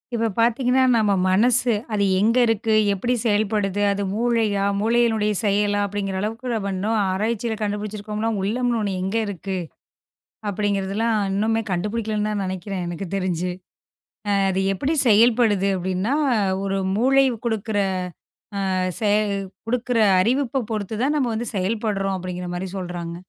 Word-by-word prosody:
இப்ப 230 0 +1
பார்த்தீங்கன்னா 250 +3 +3
நம்ம 210 -2 +2 0.2
மனசு 240 +5 +3 0.2
அது 205 - +1 0.2
எங்க 225 +5 +3
இருக்கு, 225 0 +1 0.2
எப்படி 240 +6 -1
செயல்படுது, 205 -2 0
அது 200 0 -1
மூளையா, 220 -3 +1 0.2
மூளையினுடைய 225 -1 +2
செயலா 205 0 +2
அப்படிங்கிற 195 -1 -3
அளவுக்கு 225 +4 -3
நம்ம 200 -3 -2
இன்னும் 215 +4 0
ஆராய்ச்சியில் 220 +3 -1
கண்டுபிடிச்சிருக்கோம்னா 210 +1 -3
உள்ளம்ன்னு 235 +4 0
ஒண்ணு 200 -2 -1
எங்க 190 +4 -1
இருக்கு? 195 0 -4 0.9
அப்படிங்கிறதுலாம் 205 +2 0 0.2
இன்னுமே 220 +3 +1
கண்டுபிடிக்கலைன்னுதான் 210 +2 -1
நினைக்கிறேன் 185 0 -4
எனக்குத் 175 +2 -6
தெரிஞ்சு. 180 -2 -1 0.8
அ - - +2 0.2
அது 190 0 0
எப்படி 270 - -1
செயல்படுது 220 -3 +4
அப்படின்னா, 185 +6 -1 0.5
ஒரு 195 0 -1 0.2
மூளை 270 +5 +4 0.2
குடுக்கிற 220 -2 -1 1.0
அ - - 0 0.3
செ 210 -2 +2 0.6
குடுக்கிற 245 0 0 0.2
அறிவைப் 260 +6 +1 0.2
பொறுத்துதான் 220 +7 -1
நம்ம 265 -4 +1
வந்து 230 +2 -3
செயல்படுறோம் 195 0 -1
அப்படிங்கிற 180 0 -5
மாதிரி 185 +2 -4
சொல்றாங்க. 175 -2 -5
210 Hz, 125 wpm, -22 LUFS, 195-230 Hz, 1.0 s, செயல்படுது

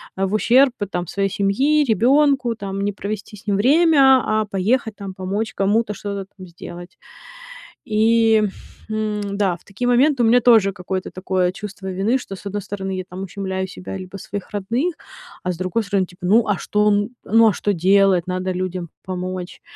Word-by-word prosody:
а, 195 0 0
в 190 - -5
ущерб, 255 +5 +4 0.2
там, 180 -2 -3
своей 195 +3 -1
семьи, 260 +11 +2
ребёнку, 265 +1 +3
там, 195 -2 -5
не 205 +1 -1
провести 205 +1 -6
с 210 +2 -16
ним 200 -1 +1
время, 275 +1 +5
а 215 0 +1
поехать, 210 +3 0
там, 200 -2 -7
помочь 195 +4 -3
кому-то, 210 +3 +1
что-то 200 -1 -5
там 185 -1 -10
сделать. 175 +1 -11 0.9
И, 225 0 +3 0.5
м, 215 -1 -2 0.2
да, 190 -4 +1
в - - -27
такие 210 +5 -4
моменты 250 +1 +3
у - - +4
меня 240 +2 +5
тоже 225 -5 +5
какое-то 185 +1 -4
такое 185 -1 0
чувство 200 0 -8
вины, 200 +7 +1
что 195 -6 -8
с - - -14
одной 205 +1 -3
стороны 195 -1 -4
я, 185 - -3
там, 185 +1 -8
ущемляю 190 0 -4
себя 185 0 -8
либо 185 +1 -8
своих 200 0 -7
родных, 235 - -1 0.5
а 180 - -1
с 175 - -6
другой 185 +5 -1
стороны, 200 -2 0
типа, 180 0 -10
ну, 220 +5 +4
а 205 -3 +1
что 210 +3 0
он, 205 +1 +2
ну, 225 +2 +5
а - - 0
что 205 +3 -1
делать? 190 0 +3
Надо 185 0 -2
людям 180 -1 -4 0.2
помочь. 185 -1 -5
200 Hz, 185 wpm, -21 LUFS, 185-225 Hz, 0.9 s, время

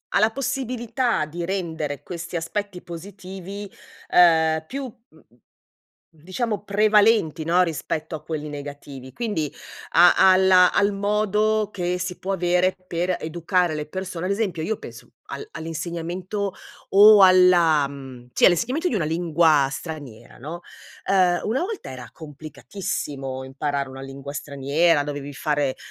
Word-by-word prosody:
alla 215 +2 +4
possibilità 250 - -1
di 170 +3 -6
rendere 165 -6 -3
questi 175 0 -7
aspetti 180 +3 -4
positivi, 190 +3 -8 0.4
uhm, 160 -2 +4
più, 275 +1 -5
mhmm, 230 - -13 0.9
diciamo, 200 +7 -3
prevalenti, 210 -5 +3
no, 175 +3 +3
rispetto 160 -1 -4
a 155 - -8
quelli 155 -2 -5
negativi, 140 -2 -9
quindi 205 - -2 0.4
a 175 +1 +7 0.2
alla 185 -1 +5
al 205 0 +2
modo 210 +1 +1
che 180 -2 -2
si 180 0 -5
può 195 +1 -3
avere 180 +1 +1
per 175 +2 -1
educare 170 +1 0
le 150 0 -4
persone, 185 0 -5
ad 195 - -1
esempio: 200 -6 -1
io 220 +5 -2
penso - - -11 0.2
al 425 - -7
all'insegnamento 170 +5 -4 0.4
o 205 0 +8
alla 175 -5 +5
mhmm, 130 -3 -11
sì, - - +4
all'insegnamento 250 - +2
di - - -3
una 170 -6 0
lingua 160 -3 +3
straniera, 145 -8 -8
no? 155 +7 -7 0.5
Ehm, 180 -2 +3
una 245 +8 0
volta 410 +2 -5
era 130 -1 -9
complicatissimo 145 -3 -6
imparare 140 +1 -3
una 135 0 -9
lingua 135 +1 -8
straniera, 145 +3 +1
dovevi 145 -1 -6
fare 145 -1 -1
175 Hz, 130 wpm, -23 LUFS, 150-200 Hz, 0.9 s, o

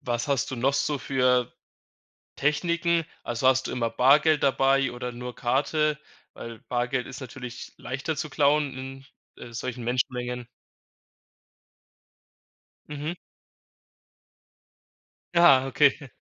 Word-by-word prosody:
was 120 +4 -2
hast 140 -3 0
du 130 - -4
noch 135 +4 +1
so 145 0 0
für 125 -2 +1 0.8
Techniken? 170 +3 +1 0.2
Also, 120 +2 -2
hast 130 0 +3
du - - -4
immer 115 -2 -1
Bargeld 150 +5 +4
dabei 135 -1 +3
oder 125 0 -5
nur 125 +1 -7
Karte? 150 +4 0 0.4
Weil 115 -1 -9
Bargeld 125 +1 -2
ist 135 - -9
natürlich 125 -1 -8
leichter 135 +5 -4
zu 155 -1 -4
klauen 145 -1 +2 0.6
in, - - -14
äh, 120 - -11
solchen 120 +1 -5
Menschenmengen. 125 0 -2 2.4
Mhm. 150 +2 -4 2.2
Ah, 170 -7 +6
okay. 140 -1 +2
130 Hz, 110 wpm, -26 LUFS, 125-145 Hz, 2.4 s, Ah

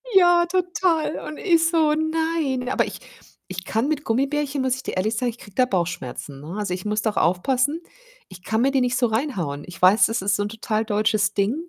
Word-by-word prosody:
Ja, 350 -2 +6
total. 355 -3 0
Und 305 - -7
ich 330 -4 +3
so: 315 -3 +3
„Nein“, 315 -5 -1
aber - - +1
ich - - -8 0.5
ich 185 0 -5
kann 225 +7 -1
mit 300 -1 -1
Gummibärchen 275 +4 0
muss 260 -1 +1
ich 260 - -9
dir - - -4
ehrlich 215 +5 0
sagen, 245 +1 0
ich 235 - -8
kriege 205 -4 -15
da 255 - +4
Bauchschmerzen, 170 - -4
ne, 165 +6 -7
also 205 -4 -2
ich 180 - -5
muss 210 0 -1
doch 220 -2 -1
aufpassen, 255 - +1 0.5
ich 185 0 -13
kann 220 0 -1
mir 275 +2 +3
die 270 -2 +2
nicht 250 +1 +1
so 250 - +2
reinhauen. 200 - -2
Ich 180 -1 -12
weiß, 195 +5 +6
es 225 -3 -1
ist 195 -1 +1
so 205 - -1
'n 205 - -3
total 220 0 -2
deutsches 215 -1 +1
Ding, 200 +6 +1
240 Hz, 220 wpm, -23 LUFS, 200-300 Hz, 0.5 s, Ja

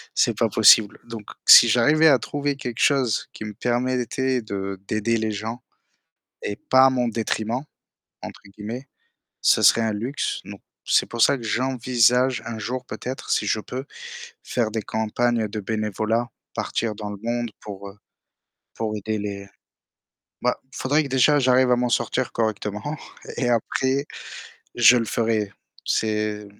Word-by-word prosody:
c'est - - +2
pas - - +2
possible. 105 -3 +5
Donc 115 -2 -8 0.2
si 120 - +10
j'arrivais 150 +8 +4
à 135 -5 +5
trouver 145 +3 -3
quelque 125 -3 -6
chose 130 -7 +2
qui 110 - -8
me 105 - -6
permettait 125 +2 -1
de 100 -2 -5
d'aider 110 +2 0
les 110 0 -2
gens 110 +4 -5 0.8
et 100 - -4
«pas 130 0 +7
à - - +4
mon 125 -2 0
détriment», 115 +3 -2 0.6
entre - - -9 0.2
guillemets, 120 +6 -7 0.5
ça - - +4
serait 115 - +6
un 110 -1 0
luxe. 120 +7 -3
Donc 100 0 -10 0.2
c'est - - +3
pour 120 -1 -5
ça 140 - +5
que 120 - -10
j'envisage 125 0 +1
un 115 -1 -5
jour 125 +4 -4
peut-être 130 +2 -7
si - - +1
je 110 - 0
peux, 130 +5 -6 0.6
faire 115 -3 -1
des 110 -1 -2
campagnes 110 +2 -1
de 110 0 -5
bénévolat, 110 +3 -2 0.3
partir 110 -2 -2
dans 105 -1 -6
le 100 - -7
monde 120 -1 -2
pour, 100 -1 -9
heu, 100 - -16 0.8
pour 110 -1 -3
aider 110 +1 -3
les 100 -1 -6 1.0
bah - - 0 0.2
faudrait 145 +4 +1
que - - -6
déjà 135 +3 +3
j'arrive 130 -1 +3
à 125 - +4
m'en 125 0 0
sortir 120 +2 -1
correctement 110 +5 -3 0.4
et - - 0
et - - +1
après 130 +4 0 0.7
je 120 +1 +7
le 115 - -1
ferai. 110 -3 -1 0.3
C'est 105 -1 -1
115 Hz, 160 wpm, -23 LUFS, 110-125 Hz, 1.0 s, si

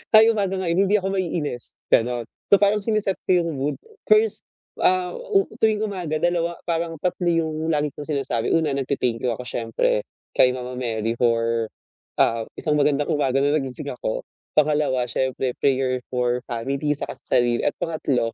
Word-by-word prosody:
ay, 220 +1 +8
umaga 200 -4 0
ngayon 170 -1 0
hindi 210 - +3
ako 190 - -3
maiinis." 155 -8 -3 0.2
Gano'n. 120 0 +2 0.3
So, 200 - +8
parang 205 +1 +3
sini-set 215 -3 0
ko 180 -1 +4
'yong 170 -1 -2
mood, 145 +2 -1 0.3
first, 430 +1 +3 0.4
ah, 185 -1 +3
o 430 -5 +1
tuwing 215 -1 +3
umaga, 180 -7 -2
dalawa 170 -1 0
parang 165 -1 -1
3 180 0 -1
'yong 160 -1 0
lagi 150 0 +1
kong 150 - -7
sinasabi. 135 -6 -1
Una, 160 -3 +2
nagte-thank 130 -4 -1
you 125 - +1
ako 125 - -6
siyempre, 115 -2 0 0.3
kay 125 - +6
Mama 125 0 -6
Mary, 115 -2 -1
for, 115 -1 +1 0.5
ah, 115 -1 +2
isang 150 -1 0
magandang 145 0 +2
umaga 135 -2 +2
na 145 +2 +3
nagising 135 -4 -3
ako, - - -3 0.4
pangalawa, 145 -4 +2
siyempre, 130 +1 -1
prayer 130 -2 +1
for 125 0 0
family 135 +5 -1
saka 145 - -6
sa - - +2
sarili, 120 -1 +1
at - - +2
pangatlo, 140 -8 0
145 Hz, 165 wpm, -23 LUFS, 125-175 Hz, 0.5 s, ay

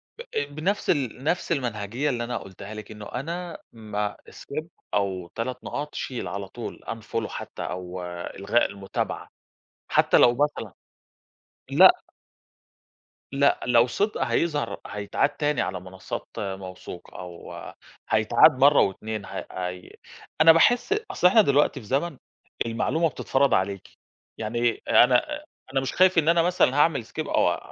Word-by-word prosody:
ب - - -9 0.3
بنَفْس 190 +7 -1
ال 130 -4 0
نَفْس 170 +4 -1
المنهجية 120 -1 -1
اللي 120 -3 -1
أنا 120 +1 -3
قُلتها 100 +2 -9
لِك، 110 0 -9
إنه 105 -1 -9
أنا 170 +10 -5 0.2
م 105 -2 -3 0.2
Skip 155 +3 -6 0.3
أو 95 -3 -1
3 125 +2 -4
نقاط، 150 +1 -5
شيل 125 -3 -4
على 100 0 -5
طول 120 +4 -7
unfollow 115 0 -4
حتى - - -7
أو 90 0 -5
إلغاء 90 +6 -1
المتابعة 100 -1 -4 0.6
حتى - - +4
لو 120 - +6
مثلًا 130 -7 -1 1.0
لأ - - +7 1.3
لأ 140 +1 +3
لو 120 0 +5
صِدق 205 - -1
هيظهر 155 -4 0
هيتعاد 105 +6 0
تاني 145 0 -1
على 95 - -2
منصّات 95 +1 -7
موثوقة 95 -2 -7
أو 90 -1 -9 0.6
هيتعاد 110 0 +6
مرّة 140 +3 +5
و2 105 +1 -2
ه 95 - -6
هي 90 0 -5 0.5
أنا 165 +1 +10
باحس 245 - +4 0.2
أصل 180 - +4
إحنا 220 +5 +6
دلوقتي 145 -4 +2
في 115 - -13
زمن 140 +6 -1 0.5
المعلومة 155 +8 0
بتتفرَض 140 -1 +1
عليكِ، 95 0 0 0.5
يعني 120 +2 -1
أنا 130 - +4 0.3
أنا 135 - +2
مش 135 - -3
خايف 185 0 +4
إن 160 -1 +4
أنا 170 0 +5
مثلًا 175 -6 +2
هاعمل 145 -6 +3
Skip - - -5
أو - - +2
120 Hz, 140 wpm, -25 LUFS, 100-150 Hz, 1.3 s, أنا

